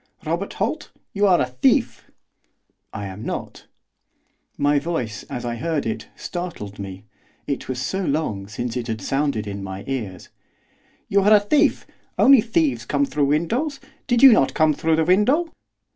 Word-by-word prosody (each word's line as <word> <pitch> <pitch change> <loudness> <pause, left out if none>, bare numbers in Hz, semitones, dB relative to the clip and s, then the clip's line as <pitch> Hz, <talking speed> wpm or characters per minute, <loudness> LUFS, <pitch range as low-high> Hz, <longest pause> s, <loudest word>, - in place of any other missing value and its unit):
'Robert - - -2
Holt, - - -2 0.2
you 205 0 +2
are 180 -2 +4
a - - +2
thief.' 125 0 0 0.8
'I 100 - -6
am 95 +3 -8
not.' - - -6 0.9
My 145 +1 +2
own - - 0
voice, 130 -10 -3
as 120 - -5
I 120 -1 -3
heard 155 +4 -2
it, 110 - -4
startled 170 - -6
me, 95 0 -8 0.4
it - - -4
was 130 -1 -3
so 190 +9 -2
long 140 - -2
since 115 +3 -4
it 125 -1 -3
had 110 -1 -3
sounded 135 -3 -1
in 100 -1 -6
my 95 +1 -6
ears. 110 -9 -5 0.8
'You 200 0 +3
are 210 +2 +5
a - - +7
thief! 205 +9 +2 0.3
Only 270 -3 +7
thieves 275 +6 0
come 285 - 0
through 150 - 0
windows, 230 - 0 0.3
did 245 -1 +2
you 270 - +11
not 135 - +2
come 155 -1 +3
through 160 +2 +1
the 160 0 +1
window? 255 - +3
145 Hz, 170 wpm, -22 LUFS, -, 0.9 s, you